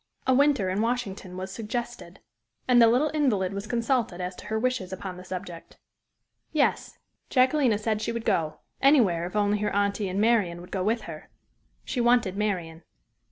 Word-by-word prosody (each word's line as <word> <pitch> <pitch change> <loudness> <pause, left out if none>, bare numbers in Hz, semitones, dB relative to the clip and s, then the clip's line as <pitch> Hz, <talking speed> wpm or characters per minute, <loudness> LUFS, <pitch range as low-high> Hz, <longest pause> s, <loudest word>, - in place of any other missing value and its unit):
A 260 - +3
winter 275 -7 +3
in 195 +3 0
Washington 210 -6 -3
was 190 +1 -5
suggested. 235 +3 -6 0.5
And 245 -1 +6
the 230 - +8
little 255 +7 +3
invalid 210 -11 +1
was 200 +1 -5
consulted 235 -5 0
as 180 0 -4
to - - -10
her 220 - -1
wishes 240 -5 -1
upon 190 0 -6
the 180 - -10
subject. 180 -2 -8 0.7
"Yes," 300 -3 0 0.3
Jacquelina 255 -3 +3
said 215 0 -1
she 230 - -2
would 230 -1 -5
go 155 -2 0 0.2
anywhere, 215 - +4
if 180 - -10
only 205 0 +2
her 210 - 0
aunty 200 0 0
and 190 +2 -2
Marian 210 -6 +2
would 175 - -12
go 190 -2 -1
with 225 +3 0
her 155 -5 -9 0.6
she 245 - -2
wanted 240 -5 +3
Marian. 180 -6 -2
210 Hz, 175 wpm, -26 LUFS, 185-240 Hz, 0.7 s, the